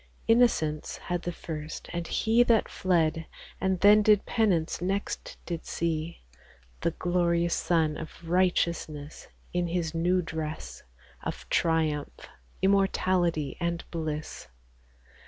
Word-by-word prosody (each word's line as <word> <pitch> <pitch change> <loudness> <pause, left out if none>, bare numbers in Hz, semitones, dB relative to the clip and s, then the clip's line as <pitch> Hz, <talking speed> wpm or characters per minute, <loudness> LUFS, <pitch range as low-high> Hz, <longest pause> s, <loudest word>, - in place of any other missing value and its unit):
Innocence 225 -11 +2
had 175 -1 -3
the 175 - -3
first; 155 -2 -7
and 170 -1 -3
he 225 +1 +3
That 230 -3 +4
fled, 165 -3 +1 0.3
and 190 -1 +1
then 210 +1 +7
did 210 -1 +4
penance, 185 -10 +1
next 195 +3 -3
did 170 -2 -4
see 165 0 -3 0.6
The - - +1
glorious 170 0 +1
Sun 160 -2 +1
of 160 +1 -9
Righteousness 170 -4 0 0.3
In 175 0 0
His 170 -2 -2
new 175 +2 +2
dress 155 -1 -5 0.4
Of - - -6
triumph, 160 -3 0 0.4
immortality, 185 -6 +2
and 170 0 -1
bliss. 155 - -4
170 Hz, 115 wpm, -28 LUFS, 160-185 Hz, 0.6 s, then